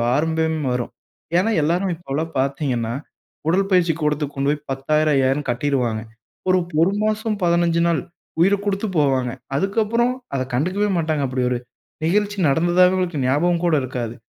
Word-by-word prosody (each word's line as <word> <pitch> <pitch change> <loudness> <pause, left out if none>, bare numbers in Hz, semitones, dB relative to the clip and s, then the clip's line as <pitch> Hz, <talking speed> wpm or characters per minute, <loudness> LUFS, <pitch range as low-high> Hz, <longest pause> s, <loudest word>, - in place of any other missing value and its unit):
ஆரம்பமே 160 +1 0
வரும். 120 -1 -3 0.5
ஏன்னா 215 +5 +2
எல்லோரும் 175 +4 +1
இப்போல்லாம் 160 0 -4
பாத்தீங்கன்னா, 130 -4 -1 0.5
உடல் 195 +3 +2
பயிற்சி 175 -3 +4
கூடத்துக்கு 150 -1 -1
கொண்டு 140 +1 +1
போய் 150 - -5
10,000, 150 +3 +1
5,000ன்னு 135 +1 +1
கட்டிருவாங்க. 120 -4 0 0.5
ஒரு 185 - +5 0.2
1 190 +4 +3
மாசம், 215 0 0
15 170 -1 +2
நாள் 165 - +1 0.4
உயிரை 195 +3 +5
குடுத்து 200 +1 -1
போவாங்க. 130 -4 +2 0.3
அதுக்கப்பறம், 225 - +1 0.2
அதக் 130 -1 -3
கண்டுக்கவே 185 +10 +1
மாட்டாங்க, 155 -3 0
அப்படி 130 0 -1
ஒரு 125 - +1 0.5
நிகழ்ச்சி 205 +4 +1
நடந்ததாக 175 +5 +4
அவுங்களுக்கு 175 -6 -1
ஞாபகம் 170 +6 +2
கூட 170 -2 +3
இருக்காது. 120 -3 -4
160 Hz, 145 wpm, -21 LUFS, 135-185 Hz, 0.5 s, ஒரு